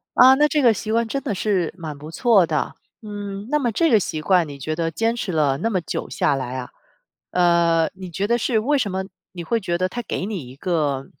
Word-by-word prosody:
啊， 260 +1 +8
那 300 +2 +4
这 300 -1 +1
个 235 -3 +5
习 215 +1 -4
惯 230 0 +1
真 275 +3 -3
的 210 - -2
是 185 -4 0
蛮 155 -4 -6
不 150 +3 -10
错 215 -4 +4
的。 155 -2 -2 0.3
嗯， 205 -1 -6
那 300 - +2
么 240 -4 0
这 330 +9 +2
个 220 -4 +5
习 155 -3 -3
惯 180 -2 +3
你 140 -1 -8
觉 155 +4 -3
得 165 0 -1
坚 225 +7 0
持 200 -5 -3
了 145 -4 +2
那 225 +9 -1
么 185 -3 0
久 - - -4
下 140 - +1
来 130 -1 -4
啊， 125 - -6 0.6
呃， 170 -2 +3
你 185 -1 -8
觉 195 +5 -2
得 235 +1 +2
是 225 -1 +1
为 285 +6 +1
什 205 -7 -1
么 190 0 -2 0.3
你 175 -2 -6
会 230 +7 0
觉 175 -3 -2
得 185 +1 0
它 240 - -4
给 190 - -3
你 180 - -5
一 130 - -12
个 145 -5 -1
185 Hz, 260 characters per minute, -22 LUFS, 160-225 Hz, 0.6 s, 啊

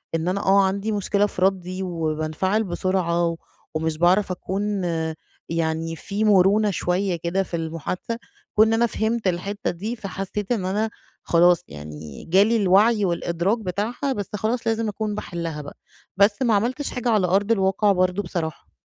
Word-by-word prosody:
إن 165 +1 -1
أنا 190 +2 0
آه 195 +1 +5
عندي 200 +3 -1
مشكلة 205 0 +1
في 200 - -5
ردي 185 0 0
وبانفعل 165 +4 -1
بسرعة 175 -3 0 0.4
ومش 160 0 -1
باعرف 185 +4 +3
أكون 195 +2 -2 0.7
يعني 165 0 -1
في 200 +6 -3
مرونة 205 +1 +4
شوية 180 +1 0
كده 170 +3 -1
في - - -15
المحادثة، 165 +7 -4 0.4
كون 215 +1 +6
إن 225 - +1
أنا 230 +1 +3
فهمت 225 -1 -1
الحتة 200 +7 -1
دي 210 +7 -4
فحسيت 195 -1 -5
إن 215 -6 0
أنا 210 +4 0 0.3
خلاص 175 0 +4
يعني 75 0 -9
جالي 200 +7 +4
الوعي 205 +2 +4
والإدراك 170 +4 0
بتاعها 225 +7 -2
بس 205 -5 -4
خلاص 225 +4 -1
لازم 225 0 +1
أكون 210 0 -3
باحلها 170 -6 -4
بقى، 145 - -10 0.4
بس 205 +4 +4
ما 235 -4 +3
عملتش 250 +8 0
حاجة 245 -1 -2
على 210 -5 +3
أرض 200 +4 +2
الواقع 200 0 +3
برضه 185 +1 +1
بصراحة. 160 - -5
195 Hz, 155 wpm, -23 LUFS, 175-210 Hz, 0.7 s, كون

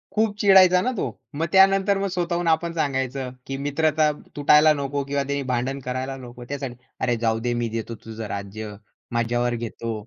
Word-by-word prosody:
खूप 215 -1 +2
चिडायचा 185 -2 +7
ना 255 - 0
तो - - 0 0.3
मग 165 - 0
त्यानंतर 195 +1 +5
मग 200 - 0
स्वतःहून 175 -1 -1
आपण 165 +1 +1
सांगायचं, 135 -4 -2 0.2
की 135 - -3
मित्रता 155 +1 +2 0.2
तुटायला 150 +1 +6
नको 140 -1 -2
किंवा 140 0 -1
त्याने 140 +1 -2
भांडण 130 +3 -1
करायला 130 +1 -3
नको 125 -1 -10
त्यासाठी. 135 -3 -4 0.2
"अरे 120 -2 +1
जाऊदे 115 +2 0
मी 120 -1 -1
देतो 115 +1 -4
तुझं 110 0 -6
राज्य, 105 +2 -7 0.4
माझ्यावर 120 +1 0
घेतो" 115 0 -4
135 Hz, 165 wpm, -24 LUFS, 120-165 Hz, 0.4 s, चिडायचा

